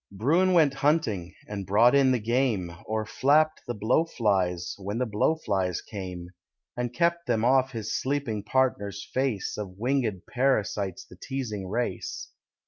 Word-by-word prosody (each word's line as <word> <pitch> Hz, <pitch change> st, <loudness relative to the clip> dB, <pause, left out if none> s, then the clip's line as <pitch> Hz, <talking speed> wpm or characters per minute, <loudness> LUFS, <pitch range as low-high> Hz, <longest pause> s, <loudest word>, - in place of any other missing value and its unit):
Bruin 160 Hz, -, +2 dB
went 155 Hz, -5 st, +5 dB
hunting, 135 Hz, -, 0 dB
and 100 Hz, -3 st, -5 dB
brought 115 Hz, +5 st, +5 dB
in 135 Hz, -2 st, +5 dB
the 125 Hz, -, +3 dB
game, 110 Hz, -6 st, 0 dB
Or 110 Hz, 0 st, -1 dB
flapped 155 Hz, +7 st, +2 dB
the 120 Hz, -, -3 dB
blow 110 Hz, +9 st, +2 dB
flies, 95 Hz, -, 0 dB
when 100 Hz, +3 st, -4 dB
the 125 Hz, -, +1 dB
blow 110 Hz, +8 st, +1 dB
flies 95 Hz, -, -1 dB
came; 90 Hz, -3 st, -7 dB, 0.5 s
And 120 Hz, -1 st, -2 dB
kept 170 Hz, +4 st, 0 dB
from 115 Hz, -2 st, +1 dB
off 130 Hz, +1 st, +3 dB
his 110 Hz, -2 st, -4 dB
sleeping 130 Hz, -6 st, -1 dB
partner's 100 Hz, -7 st, 0 dB
face 130 Hz, -7 st, -1 dB
Of 95 Hz, -3 st, -6 dB
winged 120 Hz, -5 st, 0 dB
parasites 105 Hz, -7 st, 0 dB
the -, -, -15 dB
teasing 115 Hz, -8 st, -4 dB
race. 125 Hz, -, -3 dB
115 Hz, 150 wpm, -27 LUFS, 100-135 Hz, 0.5 s, went